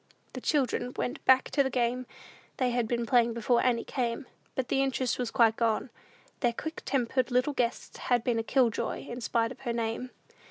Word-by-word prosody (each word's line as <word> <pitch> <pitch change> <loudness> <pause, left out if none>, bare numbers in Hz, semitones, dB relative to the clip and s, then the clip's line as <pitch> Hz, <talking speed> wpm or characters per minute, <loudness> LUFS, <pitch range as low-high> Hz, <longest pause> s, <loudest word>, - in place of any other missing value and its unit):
The - - -6
children 255 -4 0
went 250 - -3
back 260 0 +5
to 285 - +3
the 265 - +1
game 250 0 0 0.5
they 255 -2 +1
had 240 -2 0
been 235 0 -1
playing 235 -1 +3
before 235 +1 +2
Annie 240 -2 +2
came; 245 +1 -2 0.3
but 260 -2 -1
the 270 - +1
interest 260 -2 0
was 245 -2 -1
quite 230 -3 +4
gone. 230 +2 0 0.5
Their 240 -2 +1
quick 315 +7 -5
tempered 255 -1 0
little 255 +4 +2
guest 240 -3 -2
had 245 -2 +1
been 240 -2 +1
a - - -1
"kill 245 0 +3
joy" - - -3
in 240 +1 -6
spite 230 0 0
of - - -10
her 240 -3 -3
name. 230 +2 -2
245 Hz, 200 wpm, -29 LUFS, 235-255 Hz, 0.5 s, back